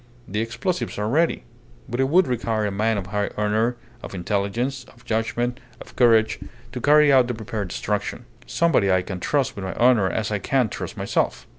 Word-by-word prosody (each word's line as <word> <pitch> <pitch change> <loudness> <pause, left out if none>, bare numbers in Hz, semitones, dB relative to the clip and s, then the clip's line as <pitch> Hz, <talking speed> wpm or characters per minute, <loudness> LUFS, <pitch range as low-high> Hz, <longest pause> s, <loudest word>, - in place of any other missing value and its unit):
The 105 +3 -3
explosives 175 - -3
are 105 +1 -1
ready. 160 +8 +1 0.4
But 120 - -4
it 135 0 +2
would 180 +4 +5
require 115 -4 -1
a 105 - -1
man 110 +2 0
of 100 - -3
high 105 +1 -2
honour, 110 +3 +1 0.3
of - - -8
intelligence, 105 +8 -2
of 120 -1 -20
judgment, 120 +3 -1 0.2
of - - -13
courage, 115 -3 +4 0.3
to 125 - -6
carry 150 +1 +5
out 130 -2 +5
the 125 - -3
prepared 110 -2 -4
destruction. 105 +5 -3 0.2
Somebody 145 - +2
I 95 -1 +3
can 95 -1 -6
trust 140 +5 0
with 100 - -6
my 95 - -4
honour 120 -6 +4
as 110 +2 -2
I 105 - 0
can 125 +3 +1
trust - - -6
myself. - - -1
115 Hz, 190 wpm, -23 LUFS, 105-130 Hz, 0.4 s, would